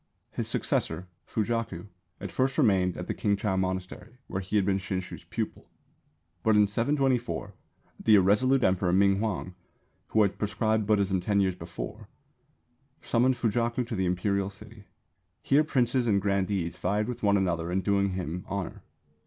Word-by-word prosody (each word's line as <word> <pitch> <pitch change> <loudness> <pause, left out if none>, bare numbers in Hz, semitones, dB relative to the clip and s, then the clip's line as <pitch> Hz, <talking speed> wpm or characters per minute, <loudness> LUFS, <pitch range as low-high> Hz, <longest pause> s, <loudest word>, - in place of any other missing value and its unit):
His - - -3
successor, 90 - -1 0.2
Fujaku, 110 -5 -2 0.3
at - - -6
first 130 +1 0
remained 90 -3 +3
at 90 - -5
the - - -2
Kingchau 100 -1 0
monastery 95 +5 -3
where 95 - -4
he 95 +3 -4
had 100 -2 +3
been 95 0 +1
Shinshū's 95 -1 -5
pupil. - - -5 0.7
But 110 -1 +3
in 105 0 +6
724 120 -1 0 0.5
the 110 - +6
irresolute 115 +7 +4
Emperor 95 -1 +2
Ming 100 +1 +4
huang, 100 -4 -2 0.5
who 110 - +3
had 100 0 -1
proscribed 110 0 0
Buddhism 100 -3 +2
ten 100 +2 +1
years 95 -1 +2
before, 95 +5 -8 0.9
summoned 125 +2 +2
Fujaku 120 +1 0
to 115 - -4
the 95 -2 0
Imperial 95 +2 0
City. 105 +1 -13 0.6
Here 145 +3 +4
princes 125 -4 +1
and 100 -3 +3
grandees 100 -3 -1
vied 105 +4 0
with 125 - -5
one 100 -1 +3
another 85 -3 -1
in 95 +2 +1
doing 100 -1 +1
him 90 -1 -4
honour. 100 -2 -4
100 Hz, 155 wpm, -28 LUFS, 95-110 Hz, 0.9 s, in